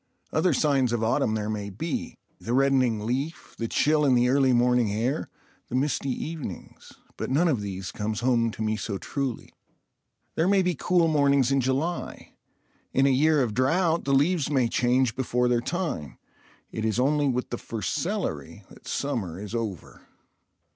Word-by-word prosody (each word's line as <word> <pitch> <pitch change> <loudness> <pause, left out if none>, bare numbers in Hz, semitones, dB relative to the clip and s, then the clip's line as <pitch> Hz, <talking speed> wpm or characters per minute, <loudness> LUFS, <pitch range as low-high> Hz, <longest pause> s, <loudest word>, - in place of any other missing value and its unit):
Other 165 +3 +3
signs 135 -4 +2
of 115 -1 0
autumn 115 -1 +1
there 105 -1 -2
may 105 -2 -3
be—the 120 - -5
reddening 130 -5 +2
leaf, 135 +7 -3
the 115 - -1
chill 150 +5 +2
in 135 -3 +4
the 120 0 +3
early 135 0 +3
morning 120 -2 +3
air, 120 +8 -1 0.4
the - - -5
misty 140 +1 0
evenings—but 150 - -7
none 150 +7 +3
of 130 -10 +1
these 95 -2 -5
comes 105 +1 -3
home 120 -2 +2
to 110 - -4
me 110 0 0
so 105 -2 -3
truly. 135 +2 -4 0.8
There 165 - +1
may 195 -1 +4
be 180 0 +1
cool 170 +2 +2
mornings 140 -4 +3
in 135 0 +3
July; 135 +7 -2 0.6
in 135 - +3
a - - +5
year 150 +2 +3
of 115 -4 -2
drought 165 - +1
the 140 - +1
leaves 150 +2 +2
may 130 -5 +2
change 125 +1 +1
before 125 -1 0
their 120 -1 +2
time; 160 - -3 0.5
it 110 - -4
is 110 +1 0
only 145 +2 +2
with 125 -1 -1
the 120 - -3
first 110 -5 -4
celery - - -3
that - - -15
summer 105 - -3
is 105 +1 -7
over. 110 -7 -5
130 Hz, 170 wpm, -26 LUFS, 115-145 Hz, 0.8 s, a